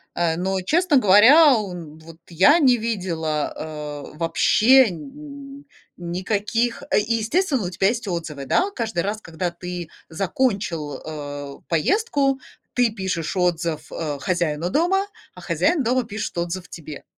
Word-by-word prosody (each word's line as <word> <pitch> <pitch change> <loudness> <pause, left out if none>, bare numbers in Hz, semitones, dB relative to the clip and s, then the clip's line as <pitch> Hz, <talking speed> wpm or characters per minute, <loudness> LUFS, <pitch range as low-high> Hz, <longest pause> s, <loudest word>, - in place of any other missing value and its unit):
э. 165 -2 +1
Но, 190 +1 -1
честно 320 - +2
говоря, 255 - +7
он 175 -7 -5
вот 160 0 -14
я 195 - +5
не 255 -5 +5
видела, 170 -9 -2 0.6
э, - - -15
вообще 215 +9 +4
нь 280 - -10 0.4
никаких, 205 +7 -1
э, - - +4
и, 225 +2 0
естественно, 260 - 0
у - - -2
тебя 190 +2 +1
есть 230 -1 -1
отзывы, 160 -6 -4
да. 380 - +2
Каждый 220 -8 -2
раз, 210 +2 -2
когда 165 +2 -4
ты 175 -1 -7 0.2
закончил, 175 - -2
э, 145 -2 -7
поездку, 275 - +1 0.3
ты 245 -3 +2
пишешь 190 -4 -3
отзыв, 170 -3 -1
э, 150 -3 -4
хозяину 170 0 -1
дома, 370 - +1 0.3
а - - -12
хозяин 330 -6 +1
дома 250 +2 +1
пишет 215 -4 -6
отзыв 175 +1 -3
тебе. 155 -3 -9
190 Hz, 140 wpm, -22 LUFS, 165-250 Hz, 0.6 s, говоря